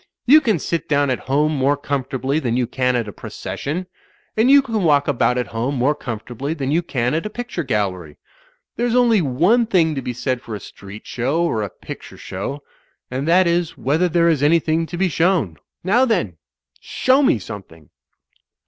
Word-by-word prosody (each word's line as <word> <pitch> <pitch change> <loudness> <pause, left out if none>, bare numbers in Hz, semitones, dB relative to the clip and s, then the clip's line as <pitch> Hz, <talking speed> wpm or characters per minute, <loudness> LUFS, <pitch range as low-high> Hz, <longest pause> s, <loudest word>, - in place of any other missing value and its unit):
You 300 +5 +7
can 220 - +1
sit 165 +1 -3
down 145 -2 +2
at 125 - -1
home 150 +3 +2
more 140 +1 +2
comfortably 135 0 -2
than 120 -5 -1
you 125 - +1
can 125 +1 0
at 120 -3 -1
a - - -6
proces - - -7
sion. 165 +6 -3 0.5
And 225 +4 +3
you 280 0 +7
can 225 -5 -2
walk 145 -5 +3
about 125 -2 +1
at 125 - 0
home 120 +5 -2
more 130 +4 +2
comfort 120 -5 -7
ably 140 +6 -3
than 140 -3 -2
you 165 +3 +2
can 125 -7 -1
at 165 +6 -1
a - - -7
picture 240 -5 -5
gallery. 95 - -2 0.6
There's 240 +1 0
only 235 -5 +4
one 175 - +2
thing 170 -7 +2
to 135 - -3
be 125 - -4
said 125 0 -2
for 110 - -7
a - - -6
street 100 +2 -12
show 135 +8 -1
or 115 -10 0
a 105 - -3
picture - - -10
show 135 +10 -6 0.2
— - - -45
and 130 +4 -3
that 180 +3 +5
is 170 -1 0
whether 160 +7 +1
there 170 +1 +3
is 160 -5 +2
anything 160 +1 +2
to 175 - -6
be 190 +1 +2
shown. 165 - +1 0.3
Now, 225 +8 +3
then! 175 - -1 0.4
Show 260 +2 +2
me 265 - +3
something!" 90 -6 -10
145 Hz, 200 wpm, -20 LUFS, 125-175 Hz, 0.6 s, You